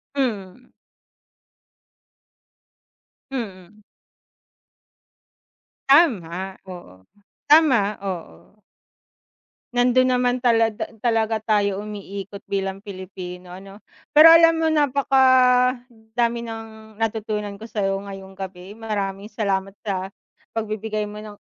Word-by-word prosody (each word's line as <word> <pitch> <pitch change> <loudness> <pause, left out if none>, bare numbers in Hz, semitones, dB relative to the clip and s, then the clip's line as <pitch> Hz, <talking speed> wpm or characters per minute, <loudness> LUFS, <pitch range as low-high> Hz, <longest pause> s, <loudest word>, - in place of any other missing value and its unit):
Mm. 230 -4 -3 2.6
Mm. 210 -5 -7 2.1
Tama, 190 - +3 0.2
oo. 95 - -11 0.5
Tama, 255 -10 +5
oo. 180 - -8 1.1
Nandun 250 +1 +3
naman 250 0 +1
talada 225 -3 +1
talaga 225 -1 +1
tayo 205 -2 0
umiikot 200 -1 -8
bilang 195 -1 -2
Pilipino 185 -2 -9
ano, 195 +2 -11 0.4
pero 325 +2 +10
alam 330 0 +6
mo 325 - 0
napakadami 250 -5 +2
ng 220 -1 -9
natutunan 215 -2 -2
ko 220 +3 -11
sayo 195 -3 -1
ngayong 195 -1 -10
gabi 190 0 -8
maraming 205 -2 -4
salamat 195 -2 -2
sa 190 -1 -2 0.5
pagbibigay 215 -1 -3
mo 210 0 -8
ng 210 -1 -11
215 Hz, 85 wpm, -22 LUFS, 195-245 Hz, 2.6 s, pero